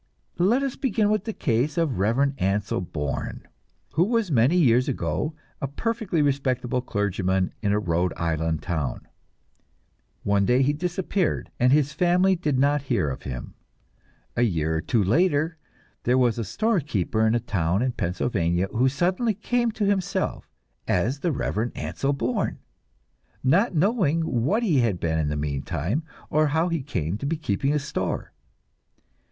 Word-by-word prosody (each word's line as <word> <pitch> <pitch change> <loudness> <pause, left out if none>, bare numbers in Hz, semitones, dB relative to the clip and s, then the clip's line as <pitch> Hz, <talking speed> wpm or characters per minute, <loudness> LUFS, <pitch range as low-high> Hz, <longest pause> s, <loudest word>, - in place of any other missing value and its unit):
Let 230 +10 +3
us 270 -2 -2
begin 215 -5 +1
with 215 -2 0
the 225 - -2
case 130 - 0
of 165 -2 +2
the - - -3
Reverend 120 +9 +2
Ansel 95 0 0
Bourne, 75 -5 -4 0.5
who 165 - +4
was 225 -2 0
many 130 +7 +4
years 125 -6 +4
ago 155 0 -2 0.3
a 140 - -1
perfectly 210 - -1
respectable 130 -3 0
clergyman 95 -4 0
in 105 -3 +1
a 105 - +2
Rhode 90 -3 0
Island 80 -1 -1
town. 80 -8 -3 1.2
One 100 0 +2
day 125 +6 +3
he 145 +2 +2
disappeared, 180 +2 -1
and 125 +1 +4
his 145 0 +3
family 180 +3 +3
did 150 -6 -1
not 145 +2 +3
hear 95 - +1
of 65 - -6
him. 65 -3 -6 0.8
A - - +1
year 80 -8 +1
or - - -1
two 110 +3 +1
later 160 - +2 0.4
there 125 +2 +2
was 120 -3 +2
a - - -1
store 220 - +1
keeper 110 - -1
in 110 - +2
a - - +2
town 95 -2 0
in 130 - +1
Pennsylvania, 90 -3 -1
who 125 +4 +2
suddenly 185 - 0
came 240 +3 0
to 210 - -1
himself 195 -1 -1 0.4
as 120 +10 +1
the 170 +3 0
Reverend 110 - -2
Ansel 140 - -2
Bourne, 125 -2 -1 0.9
not 180 - +3
knowing 165 -3 +2
what 160 - +1
he 165 - +3
had 110 -7 +1
been 80 -1 0
in 75 -2 0
the 75 - -2
meantime, 75 - -2 0.3
or 155 +1 +3
how 160 +4 +1
he 165 -3 -1
came 90 -4 -3
to 140 - -3
be 165 +2 -1
keeping 135 -1 0
a 150 - +2
store. 140 -1 -3
130 Hz, 165 wpm, -25 LUFS, -, 1.2 s, who